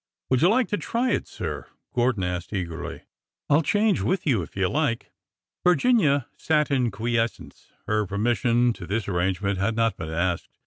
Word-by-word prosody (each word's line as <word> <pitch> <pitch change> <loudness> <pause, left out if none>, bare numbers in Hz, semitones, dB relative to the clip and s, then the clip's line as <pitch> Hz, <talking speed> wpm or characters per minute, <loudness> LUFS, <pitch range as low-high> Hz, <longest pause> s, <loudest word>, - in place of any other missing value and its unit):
''Would 130 - +3
you 175 - +6
like 245 +3 +3
to 205 - 0
try 240 +2 0
it, - - -1
sir?" - - -5 0.3
Gordon 120 -5 +1
asked 90 +2 -3
eagerly. 85 -4 -4 0.2
" - - -66
I 145 - +7
'll - - +3
change 205 +6 +2
with 185 0 0
you 125 - +2
if 85 - -9
you 95 -1 +1
'd - - -4
like." 145 -5 -1 0.5
Virginia 170 - +3
sat 150 -2 +1
in 130 -3 +2
quiescence. 115 +2 -3
Her 105 -1 0
permission 120 +4 +2
to 90 -5 -9
this 105 +3 -2
arrangement 95 +1 0
had 110 +3 0
not 115 -1 +1
been 80 - -5
asked. 85 +1 -2
115 Hz, 185 wpm, -25 LUFS, 95-150 Hz, 0.5 s, I